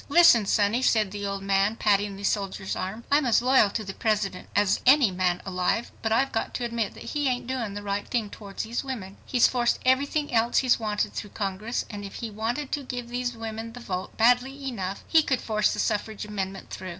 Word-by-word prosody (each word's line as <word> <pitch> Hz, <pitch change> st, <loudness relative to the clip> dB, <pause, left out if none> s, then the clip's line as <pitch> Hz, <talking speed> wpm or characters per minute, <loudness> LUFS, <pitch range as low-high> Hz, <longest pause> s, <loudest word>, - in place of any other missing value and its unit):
"Listen, 285 Hz, -, +6 dB
sonny," 210 Hz, +5 st, +2 dB
said 215 Hz, -6 st, +2 dB
the 205 Hz, 0 st, -4 dB
old 200 Hz, 0 st, -4 dB
man, 195 Hz, +2 st, +2 dB
patting 205 Hz, -2 st, +1 dB
the 200 Hz, -, -9 dB
soldier's 195 Hz, -1 st, -1 dB
arm, 195 Hz, +5 st, -4 dB
"I'm 290 Hz, +2 st, +4 dB
as 235 Hz, -, +4 dB
loyal 250 Hz, -4 st, +4 dB
to 215 Hz, +2 st, -3 dB
the 195 Hz, -1 st, -6 dB
President 210 Hz, -4 st, -1 dB
as 205 Hz, -2 st, +3 dB
any 260 Hz, -5 st, +6 dB
man 180 Hz, -1 st, 0 dB
alive, 185 Hz, +5 st, -1 dB
but 225 Hz, -, -1 dB
I've 270 Hz, +4 st, +2 dB
got 225 Hz, -, -2 dB
to 245 Hz, -, -2 dB
admit 230 Hz, -2 st, -2 dB
that -, -, -10 dB
he 290 Hz, -2 st, 0 dB
ain't 250 Hz, -2 st, -1 dB
doing 235 Hz, -5 st, -3 dB
the 205 Hz, -, -6 dB
right 200 Hz, 0 st, -2 dB
thing 225 Hz, -4 st, -1 dB
towards 200 Hz, -2 st, -6 dB
these 230 Hz, +4 st, -3 dB
women. 220 Hz, -8 st, -6 dB
He's 250 Hz, -3 st, +4 dB
forced 240 Hz, -2 st, +2 dB
everything 280 Hz, +2 st, +1 dB
else 230 Hz, +1 st, +2 dB
he's 255 Hz, -2 st, +4 dB
wanted 210 Hz, -2 st, -1 dB
through 205 Hz, -, -5 dB
Congress, 205 Hz, +3 st, -2 dB
and 205 Hz, -2 st, -7 dB
if 200 Hz, -, -8 dB
he 230 Hz, -2 st, -5 dB
wanted 235 Hz, +7 st, -3 dB
to 290 Hz, -, -2 dB
give 245 Hz, -2 st, -6 dB
these 245 Hz, -1 st, -3 dB
women 225 Hz, 0 st, -6 dB
the 245 Hz, -, -9 dB
vote 185 Hz, -6 st, -5 dB
badly 250 Hz, +4 st, +2 dB
enough 195 Hz, -6 st, -4 dB
he 320 Hz, -, +5 dB
could 265 Hz, -4 st, 0 dB
force 215 Hz, -1 st, +1 dB
the -, -, -4 dB
suffrage 210 Hz, 0 st, -1 dB
amendment 195 Hz, -2 st, -5 dB
through. 185 Hz, -, -6 dB
220 Hz, 220 wpm, -26 LUFS, 200-245 Hz, -, Listen